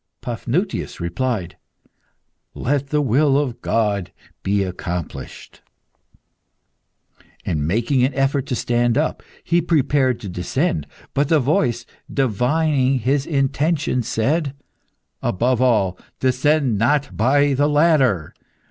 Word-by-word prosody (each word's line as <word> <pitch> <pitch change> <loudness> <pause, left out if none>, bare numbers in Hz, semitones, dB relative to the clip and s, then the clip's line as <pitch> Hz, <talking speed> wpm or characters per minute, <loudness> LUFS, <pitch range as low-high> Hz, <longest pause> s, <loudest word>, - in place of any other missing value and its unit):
Paphnutius 130 - -2
replied 95 +2 -2 1.0
"Let 140 +1 -1
the 150 +1 +1
will 135 +3 +3
of 135 -5 -2
God 105 -5 0 0.3
be 100 0 +1
accomplished!" 90 -2 -6 1.8
And 75 -2 -1
making 120 - +1
an 130 - +2
effort 135 0 0
to 125 - -1
stand 120 0 +1
up, 155 +2 0 0.2
he 170 +1 +2
prepared 140 -6 +1
to 105 - -6
descend. 90 - -1 0.3
But 140 +1 +1
the 160 - +4
voice, 125 -4 +1 0.3
divining 135 +2 +1
his 135 +4 0
intention, 145 -1 0
said 135 +6 -1 0.7
"Above 125 +5 +1
all, 105 -8 +2 0.2
descend 130 -2 +2
not 145 +4 +1
by 140 +5 +3
the 145 +2 +2
ladder. 145 - +2
130 Hz, 110 wpm, -21 LUFS, 115-145 Hz, 1.8 s, the